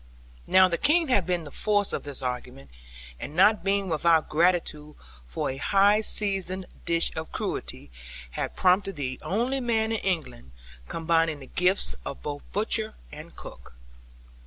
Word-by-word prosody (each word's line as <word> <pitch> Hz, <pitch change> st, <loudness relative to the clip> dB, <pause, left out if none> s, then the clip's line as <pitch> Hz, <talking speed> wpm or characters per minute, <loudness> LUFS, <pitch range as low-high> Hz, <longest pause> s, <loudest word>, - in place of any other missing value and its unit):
Now 185 Hz, 0 st, +6 dB
the 170 Hz, -2 st, -2 dB
King 315 Hz, +1 st, +3 dB
had 200 Hz, -9 st, +2 dB
seen 175 Hz, -2 st, 0 dB
the 145 Hz, -, -10 dB
force 205 Hz, +3 st, 0 dB
of -, -, -2 dB
this 140 Hz, -2 st, -7 dB
argument; 125 Hz, -, -5 dB, 0.5 s
and 150 Hz, -, -7 dB
not 195 Hz, +1 st, +5 dB
being 195 Hz, 0 st, +1 dB
without 165 Hz, -1 st, +2 dB
gratitude 155 Hz, -3 st, +1 dB, 0.3 s
for -, -, -2 dB
a 130 Hz, -, -7 dB
high 200 Hz, +7 st, +4 dB
seasoned 190 Hz, -3 st, 0 dB, 0.2 s
dish 170 Hz, 0 st, +2 dB
of 160 Hz, 0 st, -5 dB
cruelty, 70 Hz, -, -4 dB, 0.4 s
had -, -, -4 dB
promoted 190 Hz, +1 st, +2 dB
the 130 Hz, -3 st, -4 dB
only 245 Hz, +7 st, -1 dB
man 225 Hz, -3 st, 0 dB
in 225 Hz, -, 0 dB
England, 140 Hz, -, -3 dB, 0.3 s
combining 165 Hz, -2 st, +1 dB
the 135 Hz, -, -10 dB
gifts 180 Hz, -, +1 dB
of 60 Hz, -, -7 dB
both 70 Hz, -1 st, -4 dB
butcher -, -, -1 dB, 0.2 s
and -, -, -11 dB
cook. -, -, -11 dB
175 Hz, 155 wpm, -26 LUFS, 150-200 Hz, 0.5 s, Now